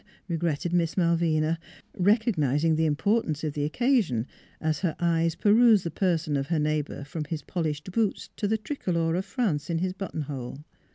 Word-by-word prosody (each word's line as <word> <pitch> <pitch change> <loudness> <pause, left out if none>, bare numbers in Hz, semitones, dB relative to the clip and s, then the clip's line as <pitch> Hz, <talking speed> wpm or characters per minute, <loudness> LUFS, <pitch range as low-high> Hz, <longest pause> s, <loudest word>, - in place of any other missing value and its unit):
regretted 170 -1 -1
Miss 170 -1 +1
Malvina, 165 -2 +2 0.4
recognizing 165 - +2
the 160 0 +2
importance 160 0 0
of 155 -2 -2
the 145 - -2
oc 150 - -4
casion, 230 - +2 0.3
as 155 -1 0
her 175 -5 -1
eyes 165 -1 +1
perused 215 0 +5
the 170 - -3
person 165 -4 0
of 135 0 -1
her 165 - 0
neighbor 150 -1 -1
from 155 +2 -5
his 150 -1 -4
polished 155 -1 -3
boots 215 0 0
to 205 - -1
the 220 +2 +1
tri 280 +7 -5
color 165 -5 0
of 185 +3 -1
France 195 - -1
in 170 - 0
his 185 +2 -1
buttonhole. 145 -8 -5
165 Hz, 175 wpm, -27 LUFS, 150-190 Hz, 0.4 s, perused